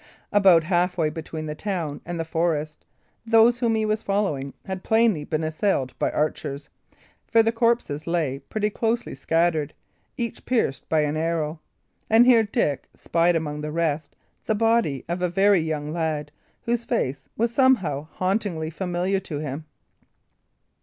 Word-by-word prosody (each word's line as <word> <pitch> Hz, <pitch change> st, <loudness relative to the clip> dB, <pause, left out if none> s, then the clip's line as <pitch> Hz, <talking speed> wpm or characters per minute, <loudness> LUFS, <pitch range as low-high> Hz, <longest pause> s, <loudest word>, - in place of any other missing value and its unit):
About 190 Hz, -5 st, +6 dB
half 180 Hz, +1 st, +1 dB
way 155 Hz, -3 st, +1 dB
between 160 Hz, 0 st, -6 dB
the 150 Hz, -, -4 dB
town 165 Hz, -4 st, -4 dB
and 175 Hz, -1 st, -4 dB
the 165 Hz, -, -2 dB
forest, 160 Hz, -2 st, -2 dB, 0.4 s
those 230 Hz, +1 st, +5 dB
whom 230 Hz, -2 st, +2 dB
he 220 Hz, 0 st, +1 dB
was 215 Hz, 0 st, 0 dB
following 185 Hz, -10 st, -1 dB
had 190 Hz, -2 st, -5 dB
plainly 220 Hz, -8 st, +3 dB
been 155 Hz, +1 st, -2 dB
assailed 155 Hz, -5 st, 0 dB
by -, -, +1 dB
archers; 145 Hz, -2 st, -2 dB, 0.6 s
for 230 Hz, -1 st, +5 dB
the 225 Hz, -, +2 dB
corpses 230 Hz, -11 st, 0 dB
lay 160 Hz, -6 st, 0 dB
pretty 210 Hz, +9 st, -2 dB
closely 230 Hz, +2 st, -1 dB
scattered, 160 Hz, +1 st, 0 dB, 0.4 s
each 235 Hz, -2 st, -4 dB
pierced 230 Hz, -, 0 dB
by 160 Hz, -1 st, +3 dB
an 150 Hz, 0 st, 0 dB
arrow. 160 Hz, -1 st, -1 dB, 0.5 s
And 225 Hz, +2 st, +6 dB
here 245 Hz, -2 st, +6 dB
Dick 205 Hz, -, -1 dB
spied 170 Hz, +1 st, +1 dB
among 150 Hz, -2 st, -2 dB
the 150 Hz, 0 st, -4 dB
rest 155 Hz, -2 st, -1 dB, 0.3 s
the 220 Hz, -, +1 dB
body 225 Hz, -, +1 dB
of 175 Hz, +2 st, -3 dB
a 180 Hz, -, +1 dB
very 195 Hz, +2 st, +4 dB
young 155 Hz, -1 st, -3 dB
lad, 155 Hz, -3 st, -2 dB, 0.3 s
whose 235 Hz, 0 st, 0 dB
face 140 Hz, -, -2 dB
was 235 Hz, +1 st, 0 dB
somehow 195 Hz, -, +2 dB
hauntingly 185 Hz, -4 st, -1 dB
familiar 180 Hz, +3 st, -1 dB
to 170 Hz, -6 st, -6 dB
him. 150 Hz, +1 st, -5 dB
170 Hz, 155 wpm, -24 LUFS, 155-215 Hz, 0.6 s, About